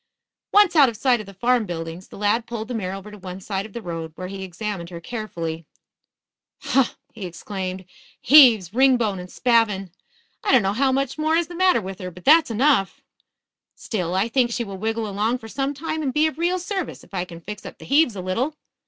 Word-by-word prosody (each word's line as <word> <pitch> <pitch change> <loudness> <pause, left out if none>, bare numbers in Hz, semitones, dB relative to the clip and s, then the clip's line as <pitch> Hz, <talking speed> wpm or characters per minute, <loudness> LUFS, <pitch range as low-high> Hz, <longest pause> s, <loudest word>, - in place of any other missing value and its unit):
Once 410 -4 +5
out 285 -5 +7
of 225 - -8
sight 250 -1 +3
of 215 - -8
the 195 - -11
farm 240 +1 +1
buildings, 165 +1 -6
the - - -12
lad 210 +3 +1
pulled 225 -2 -5
the 250 - -5
mare 195 -3 -3
to 210 +2 -11
one 185 0 -7
side 195 +1 -4
of 210 - -20
the 235 - -6
road, 165 -3 -5
where 185 0 -6
he 195 0 -7
examined 190 -1 -5
her 170 -2 -7
carefully. 170 -7 -5 1.0
"Huh!" 265 -1 +2 0.2
he 220 - -9
exclaimed. 185 +1 -6 0.3
"Heaves, 235 - +7
ringbone 240 -6 +3
and 180 0 -9
spavin. 220 -6 +1 0.5
I - - +1
don't 255 -5 +5
know 195 +1 +1
how 265 +4 +2
much 275 +2 -1
more 310 +1 +2
is 335 0 +1
the 350 - -8
matter 370 -8 +3
with 190 -1 -7
her, 185 - -5
but 180 0 -14
that's 315 0 +6
enough. 230 -3 +2 0.7
Still, 180 -5 -3
I 195 +4 +2
think 245 0 +2
she 235 0 -1
will 195 -3 -8
wiggle 225 +1 -2
along 210 +4 0
for 225 - -11
some 275 +5 -2
time 315 +2 -3
and 275 -3 -1
be 300 +3 +2
of 315 -1 -2
real 350 +2 +1
service 375 0 -4
if - - -20
I 180 -2 -1
can 170 -2 -10
fix 210 +5 -8
up - - -9
the - - -12
heaves 280 -5 +3
a 190 - -4
little. 235 +12 -1
220 Hz, 220 wpm, -23 LUFS, 190-265 Hz, 1.0 s, out